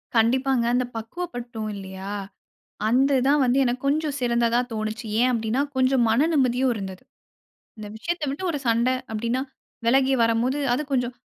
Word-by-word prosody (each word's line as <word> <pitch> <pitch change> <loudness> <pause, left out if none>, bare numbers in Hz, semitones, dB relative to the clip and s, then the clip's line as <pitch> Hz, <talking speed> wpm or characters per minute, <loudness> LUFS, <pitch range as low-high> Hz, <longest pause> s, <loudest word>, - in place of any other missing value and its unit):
கண்டிப்பாங்க. 250 +2 +3
அந்த 250 0 +2
பக்குவப்பட்டோம் 235 -3 -5
இல்லயா! 190 0 -7 0.8
அந்து 270 +4 +3
தான் 290 +1 +4
வந்து 250 +1 +2
எனக்கு 250 0 -1
கொஞ்சம் 295 0 0
சிறந்ததா 235 -1 +2
தோணுச்சு. 215 +1 -4 0.2
ஏன் 250 - +4
அப்பிடின்னா, 230 +2 0
கொஞ்சம் 260 -1 +3
மன 250 +8 +3
நிம்மதியும் 260 -2 +2
இருந்தது. 190 -3 -7 0.7
இந்த 215 -1 -7
விஷயத்த 335 +8 -3
விட்டு 280 +7 -5
ஒரு 300 - -2
சண்ட 230 +2 +3 0.2
அப்பிடின்னா, 235 +4 -1 0.4
விலகி 265 +3 +4
வரம்போது 230 +5 +1 0.2
அது 300 - -2
கொஞ்சம் 245 -1 0
245 Hz, 145 wpm, -24 LUFS, 225-265 Hz, 0.8 s, தான்